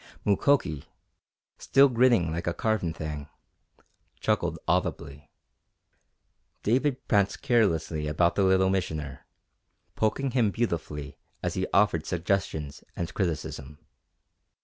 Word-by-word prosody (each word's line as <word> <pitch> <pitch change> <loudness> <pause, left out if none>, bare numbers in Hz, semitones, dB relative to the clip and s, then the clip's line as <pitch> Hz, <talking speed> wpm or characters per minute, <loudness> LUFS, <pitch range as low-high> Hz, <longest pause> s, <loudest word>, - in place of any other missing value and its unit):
Mukoki, 100 - +2 0.7
still 140 +1 +5
grinning 120 - +3
like 85 +2 -4
a 85 - 0
carven 110 -7 0
thing, 75 -2 -6 0.9
chuckled - - 0
audibly. 70 +1 -2 1.3
David 130 +4 0
pranced 100 -2 +1
carelessly 85 - +1
about 85 +3 +2
the 100 - +1
Little 95 0 +4
Missioner, 75 -8 -3 0.7
poking 130 +5 0
him 120 -4 +2
beautifully 75 - -3 0.2
as - - -1
he - - -1
offered 100 -6 +2
suggestions 90 -4 -2
and 85 -1 -4
criticism. 75 -5 -3
90 Hz, 105 wpm, -27 LUFS, 75-110 Hz, 1.3 s, still